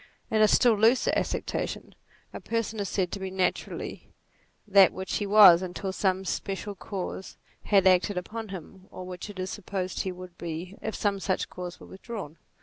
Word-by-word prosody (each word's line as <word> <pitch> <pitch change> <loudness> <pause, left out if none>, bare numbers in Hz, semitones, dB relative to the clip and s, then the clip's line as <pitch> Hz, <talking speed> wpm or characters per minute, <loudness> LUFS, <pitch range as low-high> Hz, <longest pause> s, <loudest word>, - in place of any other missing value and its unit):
In 220 -1 +3
a 215 - +7
still 235 +3 +5
looser 225 +4 +3
acceptation, - - -3 0.4
a - - -6
person 230 -1 -2
is 200 - -2
said 185 -3 -1
to 200 - -4
be 190 0 -4
naturally, 185 -1 -3 0.6
that 195 -2 +6
which 190 0 -3
he 205 - -2
was 200 -4 +8
until 185 +1 -4
some 190 -1 0
special 195 +3 -3
cause 190 -1 -6 0.3
had 195 -2 +4
acted 185 +1 +4
upon 220 +5 -5
him, 190 +1 -10
or 185 - -8
which 180 +2 -7
it 205 - -9
is 185 0 -3
supposed 185 -2 -4
he 190 - -1
would 180 -1 -10
be 170 +3 -5
if 220 - -4
some 200 -2 0
such 190 -1 -1
cause 180 -1 -7
were - - -12
withdrawn. 195 -6 -8
190 Hz, 180 wpm, -27 LUFS, 185-205 Hz, 0.6 s, was